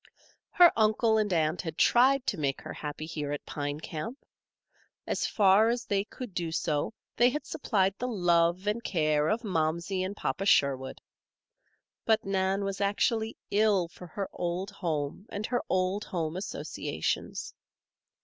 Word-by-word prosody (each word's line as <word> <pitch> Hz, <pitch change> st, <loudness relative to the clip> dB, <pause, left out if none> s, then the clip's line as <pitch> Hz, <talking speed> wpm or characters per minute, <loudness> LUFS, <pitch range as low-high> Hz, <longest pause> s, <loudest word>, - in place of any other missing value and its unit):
Her 350 Hz, -2 st, +7 dB
uncle 220 Hz, 0 st, +3 dB
and 210 Hz, -2 st, 0 dB
aunt 160 Hz, -1 st, +1 dB
had 160 Hz, -2 st, -6 dB
tried 265 Hz, +2 st, +4 dB
to 200 Hz, -, -1 dB
make 140 Hz, -2 st, -1 dB
her -, -, -7 dB
happy 150 Hz, +1 st, -6 dB
here 150 Hz, -3 st, -4 dB
at 145 Hz, -, -4 dB
Pine 145 Hz, 0 st, -4 dB
Camp. 160 Hz, -, -5 dB, 0.9 s
As -, -, -1 dB
far 205 Hz, +2 st, +5 dB
as 240 Hz, 0 st, -1 dB
they 200 Hz, -1 st, +1 dB
could 245 Hz, -2 st, -8 dB
do 170 Hz, -2 st, -2 dB
so 160 Hz, +3 st, -1 dB, 0.2 s
they 240 Hz, +1 st, +6 dB
had 300 Hz, +4 st, -4 dB
supplied 195 Hz, -8 st, 0 dB
the 250 Hz, -, -2 dB
love 175 Hz, -4 st, +2 dB
and 215 Hz, +3 st, -1 dB
care 155 Hz, -3 st, +1 dB
of 225 Hz, +3 st, 0 dB
Momsey 170 Hz, 0 st, -1 dB
and 195 Hz, +2 st, -4 dB
Papa 195 Hz, -, -2 dB
Sherwood. 130 Hz, -6 st, +2 dB, 1.0 s
But 220 Hz, -1 st, +2 dB
Nan 195 Hz, 0 st, 0 dB
was 195 Hz, 0 st, -3 dB
actually 220 Hz, +2 st, 0 dB
ill 205 Hz, -4 st, +3 dB
for 180 Hz, +1 st, -12 dB
her 195 Hz, +4 st, -4 dB
old 180 Hz, +3 st, -3 dB
home 165 Hz, -1 st, -3 dB
and 205 Hz, +1 st, -4 dB
her 245 Hz, 0 st, 0 dB
old 185 Hz, +2 st, +1 dB
home 165 Hz, -2 st, -3 dB
associations. 190 Hz, +3 st, -3 dB
190 Hz, 155 wpm, -29 LUFS, 160-215 Hz, 1.0 s, Her